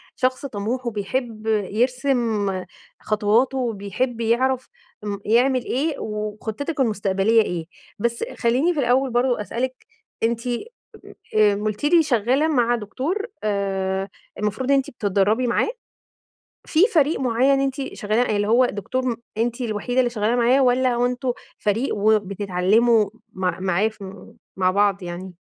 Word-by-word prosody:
شخص 255 +2 0
طموح، 240 +2 -3
وبيحب 225 +1 -3
يرسم 225 0 +1 0.5
خطواته، 220 +5 +1
وبيحب 235 +1 -2
يعرف 255 +3 +1 0.3
امم 200 -1 -3
يعمل 250 +3 +3
إيه، 290 +4 -1
وخطتِك 215 +8 -4
المستقبلية 210 -1 +2
إيه، 175 -5 -3 0.3
بس 235 +1 -1
خليني 260 +9 +2
في 300 - -3
الأول 260 +1 +2
برضه 245 -1 +1
أسألِك، 255 +4 -4 0.4
أنتِ 230 0 +1 0.9
آآ 210 -1 +5
قُلتِ 210 +2 -3
لي 330 +1 +5
شغالة 260 +3 +2
مع 240 -5 +2
دكتور 275 - -3 0.2
آآ 195 -1 -1 0.3
المفروض 215 +6 -1
أنتِ 275 -1 +2
بتتدربي 210 +3 +1
معاه؟ 240 - +1 1.0
في 315 - 0
فريق 305 0 +3
معيّن 260 +2 +2
أنتِ 270 0 -2
شغال 215 +1 -1
يعني 240 -3 +2
اللي 205 0 0
هو 245 +3 +5
دكتور 245 +3 -2 0.2
أنتِ 235 +2 -1
الوحيدة 240 +2 -1
اللي 245 -1 +3
شغال 225 +1 0
معاه، 245 +3 +4
والّا 250 0 +3
هو 245 +1 +2
أنتم 250 +1 -1 0.3
فريق 210 +5 0
وبتتعلموا 205 +1 +2 0.2
مع 185 -2 -2
معاه 190 +3 +1
في 200 -3 -10 0.2
مع 185 -1 +3
بعض 200 -1 +2
يعني؟ 180 +2 -7
230 Hz, 130 wpm, -22 LUFS, 205-255 Hz, 1.0 s, آآ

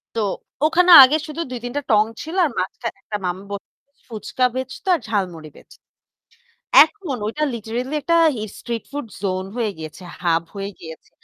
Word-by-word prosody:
তো 225 - 0 0.4
ওখানে 355 +3 +4
আগে 275 +4 +4
শুধু 310 +2 -5
২-৩টা 245 +3 -4
টং 210 -1 +6 0.2
ছিল 320 +3 -7
আর - - 0
মাঝখানে 195 +5 -4
একটা 210 - -4
মাম 180 0 -1
ব - - -10 0.6
ফুচকা 240 +2 -2
বেঁচতো 260 +6 -6
আর - - -4
ঝালমুড়ি 180 -7 -3
বেঁচ - - -18 1.1
এখন 320 -4 -6
ঐটা 300 +8 -1
লিটারেলি 235 +5 -4
একটা 335 +4 +2 0.4
স্ট্রিট 235 -2 -5
ফুড 285 -2 -5 0.2
জোন 185 -1 -1
হয়ে 230 -3 0
গিয়েছে, 160 +3 -9 0.2
হাব 165 -2 +2
হয়ে 200 0 -4
গিয়েছে। 160 -1 -11
235 Hz, 155 wpm, -21 LUFS, 195-290 Hz, 1.1 s, টং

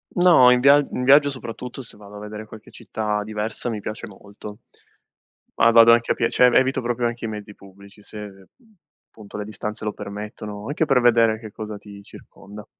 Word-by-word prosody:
No, 175 -8 +6
in 125 0 +4
via 140 +2 +6
in 125 - -3
viaggio, 140 +2 +5
soprattutto 125 0 -7
se - - -10
vado 105 0 -14
a - - -9
vedere 105 +1 -9
qualche 110 0 -14
città 105 -1 -4
diversa, 110 +2 -4
mi 110 -2 -4
piace 110 +2 -7
molto. 105 +1 -12 1.0
Ma 115 - +4
vado 115 0 +7
anche 115 0 +1
a - - -14
pie 115 - -1
cioè, 125 - +4
evito 130 +1 +1
proprio 120 0 -1
anche 120 0 -5
i - - -3
mezzi 105 -1 -8
pubblici, 100 +1 -17
se 100 -2 -11 0.6
appunto 105 -2 -12
le 105 - -5
distanze 105 0 -6
lo 105 - -2
permettono 105 0 -8
anche 150 +3 -1
per 130 -3 +2
vedere 115 -2 +3
che 110 -2 -11
cosa 105 0 -7
ti 100 -1 -13
circonda. 105 +1 -14
110 Hz, 190 wpm, -22 LUFS, 105-120 Hz, 1.0 s, vado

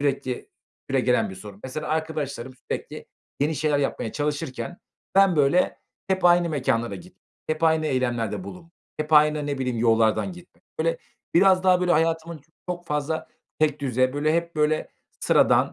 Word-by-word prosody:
sürekli 135 -3 -2 0.4
süregelen - - +2
bir - - -8
sorun. 100 +1 -11
Mesela, 150 +4 -5
arkadaşlarım 150 -5 -3 0.2
sürekli - - -5 0.3
yeni 150 +3 +1
şeyler 150 0 +1
yapmaya 135 -5 -2
çalışırken 150 +2 -3 0.4
ben, 195 -3 +5
böyle, 150 +5 +3 0.3
hep 190 -1 0
aynı 175 0 +5
mekânlara 125 -6 0
git, 180 +1 -12 0.3
hep 155 +1 -2
aynı 160 -1 +3
eylemlerde 125 - -1
bulun, 175 -3 -11 0.2
hep 155 +1 -4
aynı, 150 -1 +5
ne 140 -1 -2
bileyim, 125 -3 -2
yollardan 115 - +2
gitmek. 175 0 -16 0.2
Böyle, 165 +1 0 0.4
biraz 185 +1 +5
daha, 185 -1 +5
böyle, 180 -1 +2
hayatımın 165 0 0 0.3
çok 175 -1 -4
fazla 150 +1 -2 0.3
tekdüze, 135 -4 +1
böyle, 150 +2 +1
hep, 170 -1 -2
böyle, 155 0 +1 0.3
sıradan, - - +3
155 Hz, 150 wpm, -24 LUFS, 135-170 Hz, 0.4 s, ben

